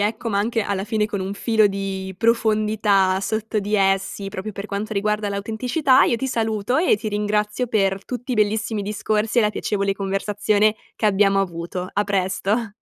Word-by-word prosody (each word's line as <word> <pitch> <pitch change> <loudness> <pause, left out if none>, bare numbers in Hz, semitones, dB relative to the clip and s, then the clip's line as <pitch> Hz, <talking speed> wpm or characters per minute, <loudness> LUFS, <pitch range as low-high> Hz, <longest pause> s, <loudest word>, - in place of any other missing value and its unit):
ecco, 220 +3 -1
ma 200 -2 0
anche 225 +2 0
alla 200 -1 -2
fine 215 0 0
con 205 -3 -4
un 195 +2 -3
filo 220 0 +3
di 195 -1 -4
profondità 215 -3 +2
sotto 220 +1 -2
di 205 +1 -2
essi, 195 0 +1
proprio 210 +2 -6
per 200 +2 -6
quanto 210 +2 -4
riguarda 210 +1 0
l'autenticità, 245 +7 +2
io 235 - +1
ti 265 +2 -3
saluto 220 0 -1
e 320 - +3
ti 215 +1 -4
ringrazio 210 +3 -1
per 195 -3 0
tutti 250 +1 -5
i - - +1
bellissimi 215 0 0
discorsi 215 +2 -1
e - - +7
la 210 - +2
piacevole 200 -2 -1
conversazione 205 +2 +1 0.2
che 215 - +1
abbiamo 195 -1 +3
avuto. 180 0 -4
A 205 - +1
presto. 200 +3 -1
210 Hz, 175 wpm, -22 LUFS, 195-220 Hz, 0.2 s, e